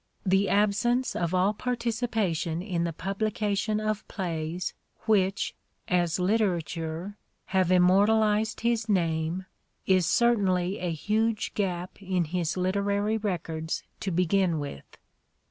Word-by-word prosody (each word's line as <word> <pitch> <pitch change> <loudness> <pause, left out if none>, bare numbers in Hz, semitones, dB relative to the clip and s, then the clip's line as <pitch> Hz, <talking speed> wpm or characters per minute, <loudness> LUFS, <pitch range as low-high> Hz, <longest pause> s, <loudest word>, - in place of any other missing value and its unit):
The 195 +1 +3
absence 215 +5 +2
of 170 +1 -1
all 190 +3 +3
participation 220 -8 -1
in 175 -4 -1
the 170 - -1
publication 210 +4 -1
of 215 -1 -2
plays 170 -2 -3 0.3
which, 200 -2 +1 0.3
as 175 -4 +1
literature, 180 -2 -1 0.3
have 185 -2 +3
im 180 -1 +6
mortalized 210 +3 +3
his 230 -1 0
name, 165 -1 0 0.4
is 185 -3 +3
certainly 195 -5 +2
a 180 -2 -2
huge 215 +6 0
gap 185 -2 -3
in 185 -2 0
his 170 +1 -2
literary 200 +3 +1
records 165 -5 -3 0.2
to 195 - -2
begin 180 0 +2
with. 140 - -7
190 Hz, 115 wpm, -27 LUFS, 175-215 Hz, 0.4 s, im